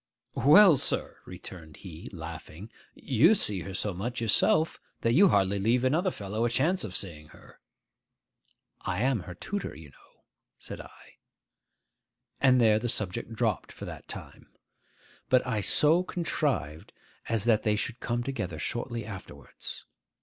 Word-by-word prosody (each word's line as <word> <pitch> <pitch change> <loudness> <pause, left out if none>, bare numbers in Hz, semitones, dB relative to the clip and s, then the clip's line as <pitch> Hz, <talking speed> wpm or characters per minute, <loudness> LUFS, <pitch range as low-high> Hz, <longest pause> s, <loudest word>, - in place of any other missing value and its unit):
'Well, 165 +2 +7
sir,' - - -1
returned 85 -4 -9
he, 85 -3 -10
laughing, 85 +4 -9 0.2
'you 130 - +4
see 105 - +5
her 95 +2 -7
so 105 +2 -1
much 110 +7 -4
yourself, 155 - +2 0.2
that 115 - +2
you 195 +9 +7
hardly 100 - +2
leave 115 +5 +2
another 160 +9 +2
fellow 105 - -4
a 120 - +2
chance 160 +10 +1
of 95 -4 -6
seeing 75 -6 -5
her.' - - -18 1.2
'I 95 0 -2
am 130 0 +1
her 90 -1 -9
tutor, 200 - -5
you 75 -1 -12
know,' - - -25 0.3
said - - -8
I. - - -17 1.2
And 130 -2 +5
there 110 -2 +4
the 120 +2 -2
subject 105 +1 -3
dropped 110 -3 -1
for - - -9
that - - -9
time. - - -9 0.8
But 130 -1 +4
I 115 -4 -1
so 155 - +4
contrived 140 - -2 0.4
as 115 -3 0
that 110 -2 +3
they 105 -1 +1
should 120 +3 -4
come 120 0 -2
together 95 -11 -4
shortly 120 - -4
afterwards. 95 - -9
110 Hz, 150 wpm, -28 LUFS, 95-130 Hz, 1.2 s, Well